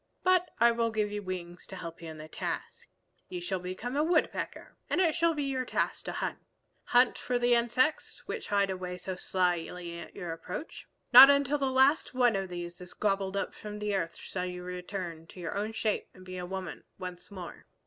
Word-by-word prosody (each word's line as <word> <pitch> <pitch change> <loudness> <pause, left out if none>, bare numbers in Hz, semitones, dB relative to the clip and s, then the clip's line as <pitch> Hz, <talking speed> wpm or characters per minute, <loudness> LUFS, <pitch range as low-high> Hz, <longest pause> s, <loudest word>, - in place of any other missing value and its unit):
But 365 -1 +4
I 235 +1 +7
will 230 0 +1
give 215 -2 0
you 210 0 -3
wings 180 -2 -6
to 190 - -8
help 170 -2 -7
you 165 - -7
in 160 - -8
the 155 0 -8
task. - - -5 0.4
You 360 - -4
shall 350 - -2
become 185 +8 -5
a 295 - +3
Woodpecker, 320 -1 0
and - - +1
it 335 -4 +4
shall 335 -1 +2
be 295 - -1
your 265 -2 -1
task - - -1
to - - -2
hunt, - - -3 0.5
hunt 245 0 +4
for 250 - 0
the 245 0 +3
insects 245 +6 +1
which 465 - -5
hide 200 -1 +2
away 180 -1 -4
so 185 +1 -4
slyly 175 -1 -1
at - - -10
your 175 -3 -4
approach. 180 - -7 0.3
Not 270 - +13 0.2
till 290 +2 0
the 270 -1 +1
last 265 +2 +3
one 245 -3 +4
of 195 -1 -2
these 175 0 -6
is 180 - -9
gobbled 195 -1 0
up - - -2
from 210 -1 -7
the 210 0 -1
earth 170 -4 -1
shall 180 -1 -4
you 180 0 -6
return 180 -2 -5
to 185 - -12
your 170 -2 -4
own 210 +2 -1
shape 220 -1 -1
and 185 -1 -14
be 185 0 -6
a 180 - -5
woman 190 -1 -5
once 180 -1 -7
more." 185 -4 -9
195 Hz, 210 wpm, -30 LUFS, 180-245 Hz, 0.5 s, Not